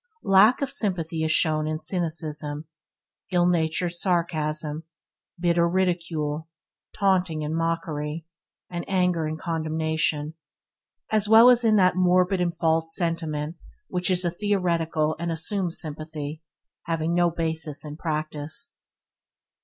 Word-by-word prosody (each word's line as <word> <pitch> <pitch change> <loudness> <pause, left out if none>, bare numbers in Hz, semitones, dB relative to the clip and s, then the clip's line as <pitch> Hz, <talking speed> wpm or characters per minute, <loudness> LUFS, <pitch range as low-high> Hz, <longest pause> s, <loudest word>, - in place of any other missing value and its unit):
Lack 205 +8 +5
of 275 - -2
sympathy 175 - -1
is 160 - +1
shown 155 -1 +2
in 155 0 -1
cynicism, 155 -3 -3 0.7
illnatured 175 -1 +1
sarcasm, 155 -4 -1 0.6
bitter 170 -1 +2
ridicule, 165 -4 -1 0.5
taunting 180 -6 +1
and 150 +1 -3
mockery, 165 -2 -2 0.4
and 175 -1 -5
anger 180 -4 +1
and 155 0 -4
condemnation, 160 -2 -1 0.8
as 215 -1 +2
well 225 +3 +9
as 245 -1 +3
in 220 -2 +4
that 185 -3 +4
morbid 185 +1 +3
and 170 -1 -1
false 165 -1 +1
sentiment 165 -2 -2 0.3
which 180 +1 -1
is 180 -1 +3
a 170 - +1
theoretical 170 -5 0
and 170 0 -2
assumed 175 +2 -1
sympathy, 155 -1 -6 0.5
having 165 0 0
no 175 0 +3
basis 160 -3 -2
in 150 0 -6
practice. 155 - -3
165 Hz, 120 wpm, -25 LUFS, 155-180 Hz, 0.8 s, well